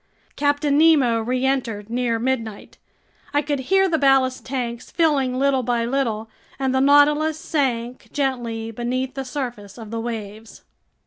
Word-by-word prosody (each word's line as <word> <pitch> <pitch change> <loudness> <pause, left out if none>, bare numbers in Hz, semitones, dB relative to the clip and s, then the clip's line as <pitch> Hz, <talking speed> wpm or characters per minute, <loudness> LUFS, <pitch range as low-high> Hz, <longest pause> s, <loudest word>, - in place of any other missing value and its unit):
Captain 285 0 +1
Nemo 285 -8 +4
reentered 250 -3 -1
near 235 0 0
midnight. 225 -3 -3 0.6
I 290 - +3
could 290 -1 -1
hear 385 0 +4
the 325 -3 0
ballast 270 -2 +3
tanks 245 -3 -4
filling 280 -6 +1
little 270 -1 +2
by 240 -1 0
little, 230 -4 -1 0.3
and 265 -1 -1
the 265 - +2
Nautilus 295 +2 +4
sank 260 -8 -2
gently 240 -5 -2
beneath 250 +3 -3
the 270 0 -4
surface 245 -7 -6
of 225 -2 -9
the 230 - -3
waves. 220 -1 -7
255 Hz, 140 wpm, -22 LUFS, 230-280 Hz, 0.6 s, Nemo